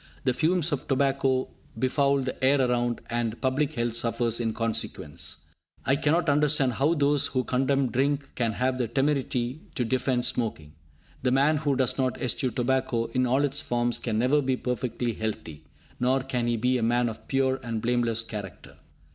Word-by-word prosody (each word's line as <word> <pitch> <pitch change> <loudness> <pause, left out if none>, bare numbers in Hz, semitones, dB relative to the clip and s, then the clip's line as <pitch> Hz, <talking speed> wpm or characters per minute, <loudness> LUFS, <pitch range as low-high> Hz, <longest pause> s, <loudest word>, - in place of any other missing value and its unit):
The 130 - +2
fumes 170 +3 +1
of 145 -2 -3
tobacco 135 -1 +1 0.3
befoul 140 +1 +2
the 130 0 -5
air 140 +2 +4
around, 120 -2 +1
and 120 -1 -1
public 140 +3 0
health 120 -1 -1
suffers 115 0 0
in 115 -2 0
consequence. 110 -9 -3 0.4
I 135 - +3
cannot 160 +4 +1
understand 145 -3 +3
how 145 +8 +2
those 145 -1 +2
who 130 -1 -1
condemn 135 +1 +1
drink 140 +2 0
can 115 -3 0
have 130 +3 0
the 120 - 0
temerity 135 0 -1
to 125 - 0
defend 125 0 0
smoking. 80 -11 -1 0.5
The 125 - +1
man 140 +4 +3
who 145 -2 0
does 130 0 +1
not 130 -1 0
eschew 130 +1 -1
tobacco 120 -1 0
in 130 0 +2
all 135 +4 +3
its 140 +1 -2
forms 120 0 0
can 110 -3 -2
never 130 +6 +3
be 130 -1 0
perfectly 125 -1 -2
healthy, 85 -9 -5 0.3
nor 130 +2 +2
can 125 -3 -1
he 120 -1 +1
be 125 +3 +1
a - - -3
man 120 +2 +2
of 110 -1 -7
pure 135 -1 +1
and 115 -3 -3
blameless 115 -1 +1
character. 105 -4 -8
130 Hz, 175 wpm, -27 LUFS, 120-135 Hz, 0.5 s, air